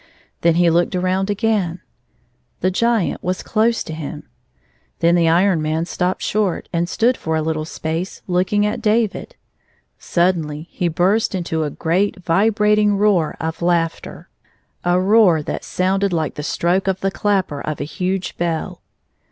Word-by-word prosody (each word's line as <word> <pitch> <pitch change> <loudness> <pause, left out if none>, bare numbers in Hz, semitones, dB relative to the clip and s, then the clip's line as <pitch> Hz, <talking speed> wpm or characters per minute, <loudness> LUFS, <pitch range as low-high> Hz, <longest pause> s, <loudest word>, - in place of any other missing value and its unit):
Then 170 -1 +3
he 175 -1 +4
looked 175 +2 +1
around 185 +2 0
again; 205 -5 0 0.8
the 185 - +2
Giant 230 0 +1
was 180 +1 -2
close 230 +1 +1
to 160 - -7
him. 155 -1 -6 0.7
Then 170 0 +3
the 170 -2 +3
Iron 175 0 +3
Man 155 +2 -1
stopped 180 +1 -2
short, 205 -4 -1
and 170 +1 0
stood 240 +6 +2
for 160 -6 -3
a 160 - +1
little 155 -1 -2
space 160 +3 -4
looking 185 +3 +1
at 210 - -2
David. 215 -1 0 0.6
Suddenly 165 -3 0
he 175 - -1
burst 190 +6 +1
into 165 -3 -2
a - - -2
great 175 +7 0
vibrating 210 +2 +3
roar 195 -6 +2
of 160 +1 -4
laughter, 170 -1 -1 0.6
a 175 0 +2
i6i 185 - 0
roar 195 -7 +5
that - - -4
sounded 195 +2 0
like 160 -3 -1
the 150 - -6
stroke 175 +5 0
of 190 -1 0
the 195 - 0
clapper 190 -9 -1
of 155 - -4
a - - -2
huge 185 +4 -3
bell. 170 -2 -2
180 Hz, 160 wpm, -19 LUFS, 165-200 Hz, 0.8 s, roar